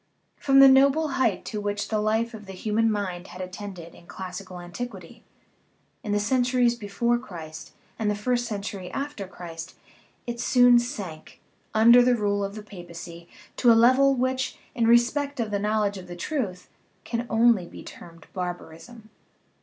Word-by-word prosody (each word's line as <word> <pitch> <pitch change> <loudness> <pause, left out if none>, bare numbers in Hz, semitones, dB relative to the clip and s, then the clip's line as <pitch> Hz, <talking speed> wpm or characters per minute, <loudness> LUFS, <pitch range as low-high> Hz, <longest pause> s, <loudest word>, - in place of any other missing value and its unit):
From 275 -1 +4
the 275 - +10
noble 275 +4 +5
height 265 -1 0
to 210 -2 -4
which 205 0 -3
the 215 - 0
life 220 +2 0
of 210 -2 -10
the 195 - -8
human 220 +4 0
mind 190 -3 -3
had 180 - -11
attained 185 +1 -7
in 170 0 -13
classical 185 0 -8
an 175 0 -10
tiquity, 195 -5 -8 0.8
in 210 - -4
the 205 - +2
centuries 245 +2 +2
before 235 +2 -1
Christ 160 -7 -9 0.3
and 215 -2 0
the 210 - 0
first 240 +3 -1
cen 210 -3 -4
tury 190 -3 -6
after 275 -8 -4
Christ, 170 -3 -9 0.5
it 235 0 -5
soon 245 0 +5
sank, 200 - -7 0.4
under 235 +3 +7
the 245 0 +4
rule 205 -2 0
of 200 +1 -4
the 215 - -8
papacy, 175 -3 -10 0.3
to 245 - +5
a 225 - +6
level 260 +4 +5
which, 260 +1 -1 0.2
in 230 -2 +1
respect 255 +4 +2
of 225 -3 -2
the 200 - 0
knowledge 210 -1 0
of 180 - -11
the 175 - -8
truth, 190 - -4 0.4
can 235 0 -3
only 225 -5 +3
be - - -11
termed 165 -1 -13
barbarism. 180 +4 -7
210 Hz, 170 wpm, -25 LUFS, 185-240 Hz, 0.8 s, the